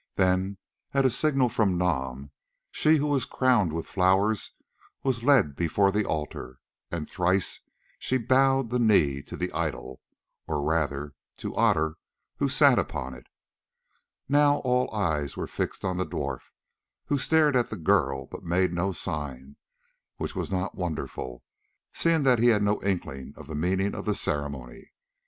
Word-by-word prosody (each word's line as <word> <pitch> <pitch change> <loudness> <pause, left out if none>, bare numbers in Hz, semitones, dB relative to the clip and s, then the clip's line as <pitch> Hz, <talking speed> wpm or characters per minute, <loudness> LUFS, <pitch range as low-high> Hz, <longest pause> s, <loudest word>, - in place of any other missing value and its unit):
Then, 95 +1 +1 0.4
at 135 -1 +3
a 130 - +4
signal 135 -1 +2
from 105 -6 +1
Nam, 70 -6 -2 0.4
she 155 +1 +3
who 145 - 0
was 145 -4 +1
crowned 125 - +2
with 80 +1 -4
flowers 95 +3 +2 0.5
was 130 -4 0
led 120 - +4
before 95 +5 +2
the 105 +1 0
altar, 75 -4 -4 0.3
and 80 -3 -4
thrice 95 +1 0 0.4
she 130 - 0
bowed 135 0 +2
the 125 - +1
knee 80 - +3
to - - -9
the - - -2
idol, 65 0 -4 0.5
or 75 -2 -1
rather 75 -2 -1 0.2
to - - -6
Otter 80 +1 +2 0.4
who - - +1
sat - - +5
upon 65 +1 -4
it. 60 -1 -13 1.0
Now 145 +1 +4
all 125 -1 +1
eyes 80 -9 -1
were - - -2
fixed - - -4
on 95 -1 -1
the 95 - +1
dwarf, - - -4 0.6
who 145 - 0
stared 155 -1 +3
at 120 -2 +2
the 110 - -6
girl 80 -7 +1
but - - -9
made 90 +1 +1
no 90 +2 -1
sign, 75 -5 -4 0.6
which - - -4
was - - -3
not 95 0 -2
wonderful, 75 -8 -5 0.5
seeing 165 -3 +2
that 130 -3 +4
he 120 - +4
had 105 -3 +4
no 105 +1 +1
inkling 70 -8 -3
of 80 - -10
the 80 - -8
meaning 95 +6 0
of - - -6
the - - +1
ceremony. 70 -4 -4
95 Hz, 160 wpm, -27 LUFS, 75-120 Hz, 1.0 s, sat